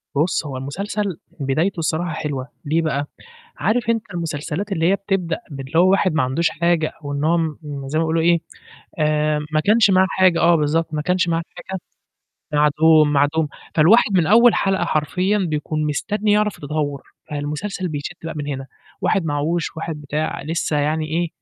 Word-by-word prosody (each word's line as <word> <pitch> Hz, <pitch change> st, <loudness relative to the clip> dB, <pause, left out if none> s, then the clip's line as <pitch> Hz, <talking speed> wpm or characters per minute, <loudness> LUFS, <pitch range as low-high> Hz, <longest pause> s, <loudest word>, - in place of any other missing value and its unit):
بُص، 160 Hz, +2 st, +1 dB
هو 135 Hz, -3 st, -5 dB
المسلسل 195 Hz, +7 st, -3 dB, 0.2 s
بدايته 155 Hz, +7 st, 0 dB
الصراحة 165 Hz, +1 st, -1 dB
حلوة، 140 Hz, -4 st, -4 dB, 0.2 s
ليه 160 Hz, +3 st, +1 dB
بقى؟ 145 Hz, -2 st, -1 dB, 0.5 s
عارف 230 Hz, 0 st, +1 dB
أنت 225 Hz, -1 st, +1 dB
المسلسلات 165 Hz, +4 st, -3 dB
اللي 165 Hz, -1 st, +2 dB
هي 195 Hz, -, +3 dB
بتبدأ 195 Hz, -4 st, -2 dB
باللي 135 Hz, +3 st, -3 dB
هو 185 Hz, +2 st, +6 dB
واحد 190 Hz, -3 st, +2 dB
ما 155 Hz, -, +2 dB
عندوش 145 Hz, +6 st, +1 dB
حاجة 170 Hz, -1 st, +1 dB
وإن 145 Hz, 0 st, -3 dB
هو 165 Hz, +2 st, +3 dB
م 160 Hz, -3 st, -1 dB, 0.3 s
زي 155 Hz, +3 st, -1 dB
ما -, -, +2 dB
بيقولوا 160 Hz, 0 st, +1 dB
إيه، 170 Hz, +1 st, +4 dB, 0.6 s
آآ 150 Hz, 0 st, +1 dB
ما 155 Hz, -, +3 dB
كانش 210 Hz, +3 st, +4 dB
معاه 190 Hz, 0 st, +5 dB
حاجة 185 Hz, -3 st, +3 dB
آه 170 Hz, +1 st, +5 dB
بالضبط، 155 Hz, +1 st, 0 dB
ما 150 Hz, -, -1 dB
كنش 180 Hz, +1 st, +1 dB
معاه 165 Hz, 0 st, +1 dB
حاجة، 190 Hz, -1 st, -6 dB, 0.7 s
معدوم، 150 Hz, +1 st, +4 dB
معدوم، 145 Hz, +2 st, +2 dB, 0.3 s
فالواحد 195 Hz, +7 st, +5 dB
من 170 Hz, -3 st, +3 dB
أول 235 Hz, +4 st, +6 dB
حلقة 195 Hz, -2 st, +1 dB
حرفيًا 180 Hz, +6 st, 0 dB
بيكون 155 Hz, -3 st, -1 dB
مستني 205 Hz, +8 st, 0 dB
يعرف 210 Hz, -1 st, +2 dB
التطوّر، 145 Hz, -1 st, -3 dB, 0.3 s
فالمسلسل 150 Hz, +6 st, -3 dB
بيشد 150 Hz, +3 st, -5 dB
بقى 165 Hz, -, -4 dB
من 145 Hz, -1 st, -4 dB
هنا، 135 Hz, -2 st, -4 dB, 0.3 s
واحد 190 Hz, -, +1 dB
معاهوش، 160 Hz, +3 st, -1 dB
واحد 160 Hz, -1 st, -5 dB
بتاع، 150 Hz, +2 st, -3 dB
لسّه 160 Hz, 0 st, -1 dB
يعني 155 Hz, +2 st, 0 dB
إيه، 170 Hz, +2 st, -1 dB
160 Hz, 170 wpm, -21 LUFS, 150-180 Hz, 0.7 s, هو